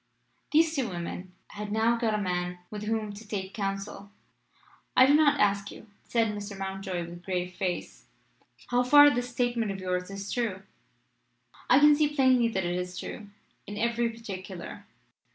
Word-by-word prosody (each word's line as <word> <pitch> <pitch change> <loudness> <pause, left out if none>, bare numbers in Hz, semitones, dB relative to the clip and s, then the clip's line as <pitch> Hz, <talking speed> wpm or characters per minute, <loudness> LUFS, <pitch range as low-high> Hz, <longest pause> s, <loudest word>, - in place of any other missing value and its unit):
These 320 +1 +4
two 265 -5 0
women 180 +1 -6
had 210 0 -6
now 225 +2 +3
got 230 -2 0
a 210 - -1
Man 180 -1 -2
with 210 0 -5
whom 215 -1 -2
to 210 +2 -11
take 195 -2 -4
counsel. 195 0 -4 0.9
"I 255 - +9
do 275 - +5
not 295 -2 +4
ask 200 -1 +2
you," - - -11 0.2
said 230 -2 +1
Mr. 205 -1 -6
Mountjoy, 190 -2 -4
with 175 +1 -10
grave 180 -1 -2
face, 180 -1 -4 0.6
"how 245 0 +3
far 290 +3 +8
this 245 0 -2
statement 240 -2 0
of 195 - -5
yours 180 0 -2
is 195 0 -6
true: 215 -6 -2 1.1
I 255 - +7
can 295 +1 +7
see 295 0 +1
plainly 260 -4 +4
that 190 -5 -2
it 175 +1 -1
is 180 0 -4
true 210 - -7 0.4
in 205 - -6
every 235 +1 +1
particular." 200 -3 -8
210 Hz, 170 wpm, -28 LUFS, 190-240 Hz, 1.1 s, I